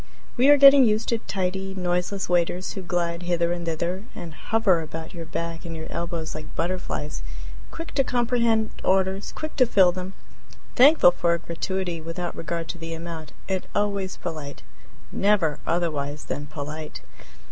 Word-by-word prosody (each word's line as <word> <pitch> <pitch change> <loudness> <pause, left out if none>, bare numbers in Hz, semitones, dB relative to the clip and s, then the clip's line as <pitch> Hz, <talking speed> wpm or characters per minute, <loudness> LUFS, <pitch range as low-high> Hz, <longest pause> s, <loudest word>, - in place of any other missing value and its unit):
We 260 +3 +5
are 290 - +8
getting 275 -1 +9
used 215 -1 +2
to 230 - +1
tidy, 190 -1 -3
noiseless 180 +1 -1
waiters, 175 +1 +1
who 195 - -5
glide 175 -1 -1
hither 175 -1 +1
and 170 -1 -5
thither, 170 +5 -2
and 165 -2 -7
hover 190 +2 +2
about 160 +2 -7
your 165 -2 -7
back 165 +1 -4
and 165 -2 -6
your 160 - -6
elbows 170 -2 -3
like 155 0 -8
butterflies, 175 -4 -3 0.5
quick 330 0 -8
to 275 - +3
comprehend 235 -3 +1
orders, 190 +1 +1
quick 310 0 -6
to 255 - +5
fill 190 -5 +5
them; 185 +1 -6 0.6
thankful 270 - +7
for 170 -1 +1
a - - -1
gratuity 170 +1 -3
without 165 +2 -4
regard 165 +1 -4
to 175 - -5
the 165 0 -5
amount; 165 -1 -7
and 190 -1 -2
always 200 -2 -1
polite 155 -5 -6 0.5
never 195 -7 +2
otherwise 150 -4 -1
than 145 +3 -4
polite. 150 - -6
175 Hz, 160 wpm, -25 LUFS, 165-195 Hz, 0.6 s, getting